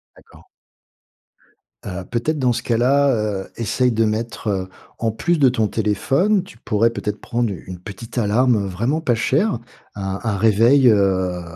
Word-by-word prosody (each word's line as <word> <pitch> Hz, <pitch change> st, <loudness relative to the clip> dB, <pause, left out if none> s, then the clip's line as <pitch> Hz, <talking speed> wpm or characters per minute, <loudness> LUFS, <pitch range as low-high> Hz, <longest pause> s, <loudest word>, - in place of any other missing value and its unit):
D'accord. -, -, -19 dB, 1.4 s
Heu, 95 Hz, -1 st, -5 dB
peut-être, 145 Hz, +6 st, -1 dB
dans 125 Hz, -2 st, +2 dB
ce 120 Hz, +1 st, -4 dB
cas-là, 130 Hz, +5 st, +2 dB, 0.3 s
heu, -, -, -16 dB
essaye 125 Hz, +3 st, +1 dB
de 115 Hz, 0 st, +1 dB
mettre, 110 Hz, +1 st, -3 dB
heu, 95 Hz, -2 st, -1 dB, 0.3 s
en 115 Hz, -1 st, 0 dB
plus 170 Hz, +10 st, 0 dB
de 135 Hz, -3 st, +5 dB
ton 110 Hz, -3 st, 0 dB
téléphone, 135 Hz, -, +1 dB
tu 185 Hz, -, -15 dB
pourrais 115 Hz, 0 st, +1 dB
peut-être 105 Hz, -2 st, -4 dB
prendre 120 Hz, -2 st, -1 dB, 0.2 s
une 90 Hz, -1 st, -7 dB
petite 105 Hz, +6 st, -10 dB
alarme, 120 Hz, +3 st, +3 dB
heu, -, -, -3 dB
vraiment 115 Hz, -, -1 dB
pas 125 Hz, -7 st, +1 dB
chère, 135 Hz, -, +1 dB, 0.4 s
un 95 Hz, -1 st, -4 dB
un 110 Hz, -4 st, -1 dB
réveil, 115 Hz, +6 st, +4 dB
heu, 95 Hz, -4 st, +1 dB
115 Hz, 160 wpm, -20 LUFS, 105-125 Hz, 1.4 s, de